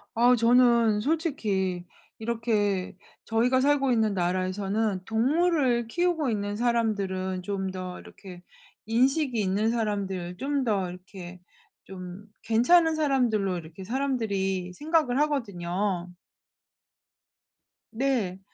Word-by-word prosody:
어 245 +2 +5
저는 235 -2 +4
솔직히 210 - -1 0.3
이렇게 220 -5 -1 0.3
저희가 245 +3 +2
살고 275 -1 +2
있는 220 -3 +2
나라에서는 185 +2 -1
동물을 255 - +1
키우고 335 +1 0
있는 205 -2 -2
사람들은 200 -5 -1
좀 190 0 -3
더 185 -1 -6
이렇게 180 -3 -12 0.4
인식이 255 +3 +1
있는 205 +3 +1
사람들, 195 -6 -2
좀 280 +4 -1
더 200 -5 0
이렇게 180 0 -11 0.4
좀 185 +1 -9 0.2
괜찮은 320 +9 +4
사람들로 245 - +1
이렇게 165 +3 -9
사람들이 200 -7 -2
생각을 295 - +1
하거든요. 190 -9 -2 1.8
네. 225 -7 -1
220 Hz, 240 characters per minute, -27 LUFS, 190-250 Hz, 1.8 s, 어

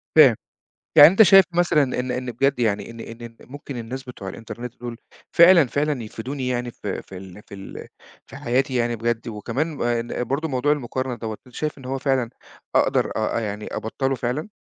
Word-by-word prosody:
فاهم، - - +8 0.6
يعني 145 +1 +11
أنت 195 +5 +4
شايف 195 -2 +8
مثلًا 170 -4 +3 0.2
إن 125 0 -2
إن 125 0 -3
بجد 135 +3 +1
يعني 110 -1 0
إن 115 - -12
إن 115 +1 -9
م 115 +2 -15
ممكن 140 -2 -8
الناس 125 +3 -6
بتوع 125 -7 -8
الإنترنت 115 +4 -8
دُول، 120 -1 -6 0.4
فعلًا، 170 -3 +7
فعلًا 145 -1 -1
يفيدوني 125 +5 -5
يعني 120 -1 -2
ف 105 - -10
في 95 0 -5
ال 95 +2 -11
في - - -13
ال 95 0 -9 0.4
في - - -12
حياتي 130 +2 0
يعني 120 -1 +1
بجد؟ 115 0 -2
وكمان 115 +7 -2
ما 120 -3 0
ن 120 +1 -4
برضه 140 +6 -2
موضوع 140 0 +1
المقارنة 130 -2 -2
دَوَّة 110 -2 -6
أنت 125 - -17
شايف 155 -1 -3
إن 135 - -12
هو 135 +1 -2
فعلًا 130 -3 0 0.5
أقدر - - +2
أ 110 +1 0
يعني 105 -1 -5
أبطّله 135 +4 -2
فعلًا؟ 125 - -3
125 Hz, 195 wpm, -23 LUFS, 115-140 Hz, 0.6 s, يعني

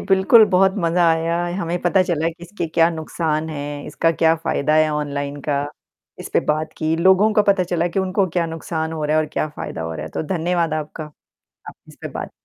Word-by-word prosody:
बिल्कुल, 195 +4 +5
बहुत 190 0 +3
मज़ा 170 0 +2
आया। 165 +1 0 0.2
हमें 170 0 -2
पता 180 +2 +3
चला 165 -3 0
कि 170 +1 -10
इसके 175 0 -5
क्या 165 0 +5
नुकसान 160 -1 -2
हैं, 145 -1 -6
इसका 165 +2 +1
क्या 165 0 +3
फ़ायदा 150 0 +1
है 155 0 +4
ऑनलाइन 145 -1 -3
का। 140 0 +1 0.6
इसपे - - 0
बात 155 +1 -2
की, 160 0 0
लोगों 190 +5 +4
का 210 0 +4
पता 200 -2 +2
चला 175 -1 -1
कि 185 - -3
उनको 190 +1 +1
क्या 170 -1 +2
नुकसान 160 0 -4
हो 155 -1 -3
रहा 150 +1 +1
है 155 - +3
और 155 - -6
क्या 155 - -1
फ़ायदा 80 - -5
हो 80 0 -4
रहा 75 - -5
है, 80 - -8
तो - - -1
धन्यवाद 170 -1 0
आपका। 155 +1 -5 0.6
आप - - -9
इस - - -15
पे - - -4
बात - - -6
165 Hz, 215 wpm, -20 LUFS, 155-180 Hz, 0.6 s, बिल्कुल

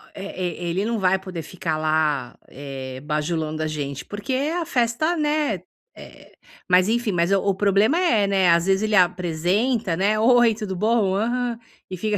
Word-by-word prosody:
eh, 195 -1 -7 0.2
e - - -2
e - - -1
ele 190 +4 -1
não 230 0 -1
vai 190 0 +2
poder 185 -3 -7
ficar 160 -1 -4
lá, 155 -4 0
eh, 135 -1 -8
bajulando 155 +1 -2
a - - -1
gente 140 -3 -5
porque 205 +5 -5
a 310 +6 -1
festa, 250 +7 0
né, 295 - 0 0.4
eh, - - -14 0.4
mas 180 +1 +5
enfim, 235 0 0
mas 175 0 0
o 195 0 +2
problema 205 - +2
é, 230 - +2
né, 190 -2 +2
às 170 0 +3
vezes, 195 +1 +2
ele 215 -1 +1
apresenta, 180 +4 +1
né: 205 +4 +1
"Oi, 240 0 +5
tudo 210 -3 -5
bom? 210 -1 +1
Aham.", 240 +2 -1 0.3
e 185 - -6
fica 210 +3 -1
195 Hz, 175 wpm, -22 LUFS, 170-230 Hz, 0.4 s, mas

